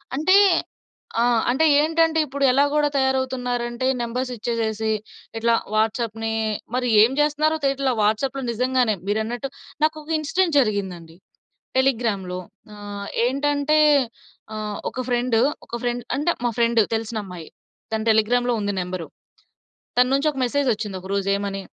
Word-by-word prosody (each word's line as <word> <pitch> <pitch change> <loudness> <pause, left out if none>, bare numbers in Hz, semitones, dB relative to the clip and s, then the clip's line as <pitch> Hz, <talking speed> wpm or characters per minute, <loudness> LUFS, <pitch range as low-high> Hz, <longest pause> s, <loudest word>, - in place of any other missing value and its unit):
అంటే 370 +7 +3 0.9
ఆ! - - +4 0.3
అంటే 265 +6 +3 0.2
ఏంటంటే 325 +1 +2
ఇప్పుడు 280 0 -4
ఎలా 275 +3 +4
గూడా 300 0 +3
తయారవుతున్నారంటే 255 -2 -1 0.2
నంబర్స్ 250 +2 -3
ఇచ్చేసేసి 220 -1 -2 0.5
ఇట్లా 230 +1 +2 0.2
వాట్సాప్‌ని 225 0 -1 0.4
మరి 250 0 0
ఏం 225 +4 +5
చేస్తన్నారో 300 +1 +2
తెలియట్లా 275 -1 +1
వాట్సాప్‌లో 255 +6 0
నిజంగానే 250 -1 +1
మీరన్నట్టు. 220 +5 -2 0.3
నాకొక 310 0 -1
ఇన్సిడెంట్ 330 +2 0
జరిగిందండి 190 -8 -2 0.6
టెలిగ్రామ్‌లో. 220 -8 0 0.4
ఆహ్, 205 -1 -7 0.2
ఏంటంటే, 285 +3 +1 0.8
ఆహ్, 210 -1 -4
ఒక 255 - -4
ఫ్రెండ్ 245 -1 +1 0.3
ఒక - - -25
ఫ్రెండ్ 245 0 -2
అంటే, 300 +5 +1
మా 240 - +2
ఫ్రెండ్ 235 -1 +3
తెలిసినమ్మాయి. 210 -7 -5 0.4
తను 220 0 -2
టెలిగ్రామ్‌లో 240 +3 +2
ఉంది 205 -1 -2
నంబరు. 180 -2 -5 0.9
తన్నుంచి 270 +4 +3
ఒక 270 - -9
మెసేజ్ 280 +2 0
వచ్చింది 210 -2 -5
ఒక 190 - -10
రోజు 195 -1 -1
ఏమని, 200 -1 -4
240 Hz, 125 wpm, -23 LUFS, 215-275 Hz, 0.9 s, ఏం